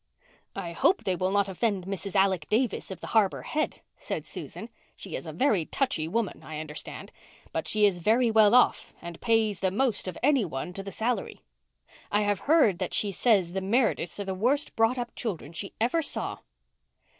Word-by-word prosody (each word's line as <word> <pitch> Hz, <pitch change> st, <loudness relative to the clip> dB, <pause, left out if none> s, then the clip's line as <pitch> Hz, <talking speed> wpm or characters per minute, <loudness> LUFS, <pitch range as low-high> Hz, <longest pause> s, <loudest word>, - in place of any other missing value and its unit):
"I 170 Hz, -, -4 dB
hope 360 Hz, -, +2 dB
they 185 Hz, -, 0 dB
will 185 Hz, +2 st, 0 dB
not 200 Hz, 0 st, +2 dB
offend 195 Hz, -1 st, -1 dB
Mrs. 195 Hz, +1 st, -5 dB
Alec 190 Hz, -5 st, +2 dB
Davis 235 Hz, +3 st, 0 dB
of 190 Hz, -3 st, -7 dB
the -, -, -6 dB
Harbour 215 Hz, -4 st, +2 dB
Head," 305 Hz, 0 st, -2 dB, 0.2 s
said -, -, -4 dB
Susan. -, -, -7 dB, 0.3 s
"She -, -, -7 dB
is -, -, -6 dB
a -, -, -4 dB
very 220 Hz, -, +2 dB
touchy 160 Hz, -, 0 dB
woman, 215 Hz, +3 st, -2 dB
I 155 Hz, -1 st, -7 dB
understand, 155 Hz, -1 st, -7 dB, 0.4 s
but -, -, -3 dB
she 210 Hz, -1 st, +3 dB
is 190 Hz, -3 st, +2 dB
very 225 Hz, +6 st, +3 dB
well 220 Hz, 0 st, +6 dB
off 250 Hz, -, +3 dB
and 170 Hz, -1 st, -9 dB
pays 225 Hz, -4 st, +2 dB
the 190 Hz, -, +1 dB
most 225 Hz, +1 st, 0 dB
of 185 Hz, -, -5 dB
any 275 Hz, -3 st, +4 dB
one 160 Hz, 0 st, -5 dB
to 195 Hz, -, -5 dB
the 195 Hz, 0 st, -7 dB
salary. 235 Hz, +4 st, -2 dB, 0.7 s
I 205 Hz, -, +3 dB
have 205 Hz, -1 st, +1 dB
heard 280 Hz, -, +5 dB
that 185 Hz, -, -2 dB
she 205 Hz, -, +2 dB
says 195 Hz, -4 st, +2 dB
the 190 Hz, -, -2 dB
Merediths 210 Hz, -2 st, 0 dB
are 200 Hz, -, -3 dB
the 190 Hz, -, -2 dB
worst 255 Hz, +10 st, +1 dB
brought 225 Hz, +3 st, +3 dB
up 240 Hz, -1 st, -4 dB
children 170 Hz, -9 st, -4 dB
she 195 Hz, +4 st, -5 dB
ever 250 Hz, +9 st, +2 dB
saw." 290 Hz, -, -3 dB
205 Hz, 195 wpm, -27 LUFS, 185-235 Hz, 0.7 s, well